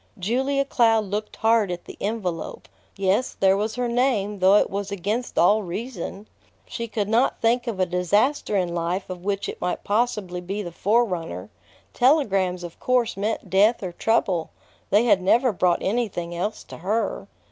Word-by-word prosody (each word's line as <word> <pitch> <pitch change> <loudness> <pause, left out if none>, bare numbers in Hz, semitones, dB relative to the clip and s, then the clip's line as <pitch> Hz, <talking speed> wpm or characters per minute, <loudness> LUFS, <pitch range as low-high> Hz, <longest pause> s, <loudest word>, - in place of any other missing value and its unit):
Julia 265 +8 0
Cloud 225 -5 +3
looked 210 +2 -4
hard 225 -2 +2
at 175 -1 -5
the - - -10
envelope. 195 -6 -4 0.3
Yes, 195 +5 0
there 190 0 +4
was 215 +2 -2
her 245 0 -1
name, 235 -5 0
though 190 +2 +5
it - - +4
was 200 0 -3
against 205 +6 -3
all 205 +6 +5
reason. 205 +1 -6 0.4
She 235 - -5
could 210 -2 -2
not 230 +5 +2
think 240 +2 +1
of 220 -5 -3
a 185 - +3
disaster 205 - +1
in 180 -2 -1
life 175 +3 -2
of 180 -1 -7
which 200 0 -2
it - - -7
might 180 - -2
possibly 205 -5 -1
be 195 +4 -4
the 175 - -6
forerunner. 180 - -1 0.4
Telegrams 195 - +2
of 170 -1 -9
course 250 -2 +1
meant 200 -1 -3
death 210 +4 +4
or 185 - -3
trouble. 185 -4 0 0.4
They 210 +3 +4
had 205 -6 +3
never 235 +6 +3
brought 180 -2 +1
anything 190 -6 -2
else 180 +5 -3
to - - -11
her. 200 +2 -2
205 Hz, 170 wpm, -24 LUFS, 185-230 Hz, 0.4 s, though